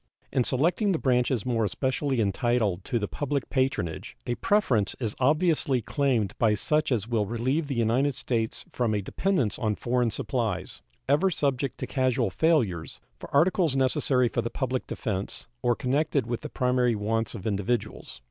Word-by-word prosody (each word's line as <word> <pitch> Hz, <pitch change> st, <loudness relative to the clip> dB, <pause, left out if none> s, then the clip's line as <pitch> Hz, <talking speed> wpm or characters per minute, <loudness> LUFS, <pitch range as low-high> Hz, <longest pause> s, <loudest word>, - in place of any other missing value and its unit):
In 130 Hz, -2 st, +3 dB
selecting 175 Hz, -, +2 dB
the -, -, +1 dB
branches 125 Hz, -4 st, +1 dB
more 115 Hz, -3 st, +1 dB
especially 130 Hz, +5 st, -1 dB
entitled 105 Hz, -2 st, +1 dB
to 120 Hz, -, -1 dB
the 105 Hz, -2 st, -1 dB
public 145 Hz, +1 st, -3 dB
patronage 130 Hz, -11 st, -1 dB
a 120 Hz, -, -1 dB
preference 120 Hz, -, +1 dB
is 110 Hz, -4 st, -2 dB
obviously 150 Hz, -1 st, +2 dB
claimed 120 Hz, -4 st, 0 dB
by 110 Hz, -2 st, +3 dB
such 150 Hz, +7 st, 0 dB
as 110 Hz, -4 st, 0 dB
will 110 Hz, -4 st, 0 dB
relieve 130 Hz, +8 st, -1 dB
the 140 Hz, -, -3 dB
United 120 Hz, +5 st, +1 dB
States 115 Hz, -3 st, -2 dB
from 115 Hz, -4 st, 0 dB
a 100 Hz, -, -1 dB
dependence 155 Hz, -, 0 dB
on 110 Hz, -2 st, 0 dB
foreign 125 Hz, +1 st, 0 dB
supplies, 110 Hz, -6 st, -3 dB, 0.3 s
ever 150 Hz, +8 st, +3 dB
subject 140 Hz, -6 st, -1 dB
to -, -, -3 dB
casual 130 Hz, -5 st, 0 dB
failures, 115 Hz, -, +1 dB, 0.2 s
for -, -, -10 dB
articles 165 Hz, 0 st, +3 dB
necessary 130 Hz, -1 st, +2 dB
for -, -, -1 dB
the 115 Hz, -, -3 dB
public 130 Hz, -1 st, -2 dB
defense 100 Hz, -6 st, -4 dB, 0.2 s
or 120 Hz, -1 st, +2 dB
connected 140 Hz, +1 st, 0 dB
with 120 Hz, 0 st, -3 dB
the 150 Hz, -, -6 dB
primary 125 Hz, -3 st, +1 dB
wants 110 Hz, +2 st, -1 dB
of 100 Hz, -, -8 dB
individuals. 105 Hz, +2 st, -2 dB
125 Hz, 165 wpm, -27 LUFS, 110-140 Hz, 0.3 s, In